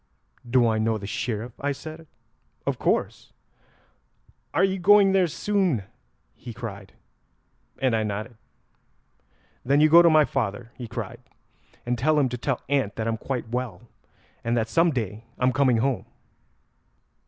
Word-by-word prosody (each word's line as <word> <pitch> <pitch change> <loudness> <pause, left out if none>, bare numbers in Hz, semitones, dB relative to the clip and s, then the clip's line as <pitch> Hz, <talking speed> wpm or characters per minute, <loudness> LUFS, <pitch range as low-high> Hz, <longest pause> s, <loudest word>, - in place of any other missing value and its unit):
'Do 120 -1 +4
I 110 -1 +1
know 110 0 +1
the 100 - -8
Sheriff?' 115 +2 -3
I 145 +1 0
said; 155 +3 -10 0.6
'of - - -1
course.' - - -1 1.2
'Are - - +2
you 190 0 +1
going 200 +2 +6
there 190 -2 +3
soon?' 185 - 0 0.5
he 120 -3 -10
cried, 100 -5 -8 0.8
and 130 -3 +1
I 110 - +1
nodded. 110 +3 -4 1.3
'Then 140 +3 +3
you 155 +1 +5
go 170 +2 +9
to 170 - +6
my 155 -2 +5
father,' 120 -2 -3
he 120 - -7
cried, - - -6 0.7
'and 120 0 -1
tell 155 +4 +2
him 135 -3 +2
to 125 - -4
tell 135 0 -2
aunt 130 -7 0
that 110 0 -3
I'm 115 0 -1
quite 125 0 -4
well, 120 -5 -4 0.6
and 115 +1 0
that 110 -1 0
some 165 +7 +3
day 110 - -3
I'm 125 0 +2
coming 130 -3 +3
home." 130 +2 -1
125 Hz, 155 wpm, -25 LUFS, 115-150 Hz, 1.3 s, go